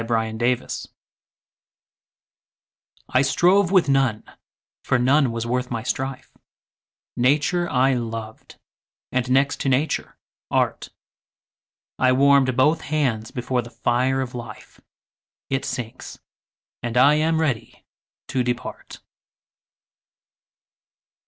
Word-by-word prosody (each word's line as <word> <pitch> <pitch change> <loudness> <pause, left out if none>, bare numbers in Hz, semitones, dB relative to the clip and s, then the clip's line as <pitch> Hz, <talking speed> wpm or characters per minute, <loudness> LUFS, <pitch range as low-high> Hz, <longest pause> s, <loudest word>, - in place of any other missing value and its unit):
9 115 -1 -1
Autoplay 120 +1 -1 2.2
I 130 0 +3
strove 175 +7 +3
with 185 -4 +4
none, 135 -5 +1 0.6
for 130 - +1
none 130 +1 +3
was 115 0 -3
worth 125 +1 -1
my 115 -2 -3
strife: 130 +1 -4 0.8
Nature 150 +7 +1
I 130 +1 +3
loved, 115 -2 -6 0.6
and, 130 0 -1
next 135 +2 +2
to 135 - 0
Nature, 135 +4 -1 0.3
Art: - - 0 1.1
I 130 0 +4
warm'd 135 -1 +4
both 150 +5 +3
hands 130 -8 -1
before 125 0 -2
the 120 - -11
fire 125 +3 0
of 130 -2 -5
Life; 115 -3 -10 0.7
It 135 -1 -1
sinks; 125 -3 -6 0.6
and 120 0 -3
I 140 +4 +6
am 160 +1 +1
ready 135 -8 -3 0.4
to 130 - 0
depart. 125 -1 -5
130 Hz, 105 wpm, -22 LUFS, 120-140 Hz, 2.2 s, I